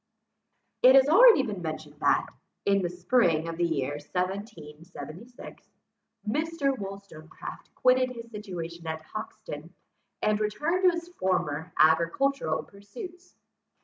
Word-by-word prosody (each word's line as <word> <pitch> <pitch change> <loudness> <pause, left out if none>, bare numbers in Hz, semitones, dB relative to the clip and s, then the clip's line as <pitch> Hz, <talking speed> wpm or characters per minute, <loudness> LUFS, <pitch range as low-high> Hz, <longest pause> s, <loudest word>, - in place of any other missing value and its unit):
It 260 +1 +8
has 270 0 +7
already 400 - +8
been 205 -7 -4
mentioned 155 -2 -6
that, - - +3 0.4
in 200 0 +3
the 175 - -1
spring 175 -3 +2
of 165 0 -5
the 175 - 0
year 145 -3 -1
1776, 180 - -7 0.6
Mr. 290 +2 0
Wollstonecraft 195 -7 -9
quitted 255 0 +3
his 235 -2 -9
situation 170 -6 -7
at 160 0 -4
Hoxton, 180 -5 -8 0.5
and 215 0 +2
returned 300 - 0
to 340 - -3
his 340 +1 -7
former 180 - -1
agricultural 165 - +2
pursuits. 355 - -11
200 Hz, 115 wpm, -28 LUFS, 165-255 Hz, 0.6 s, It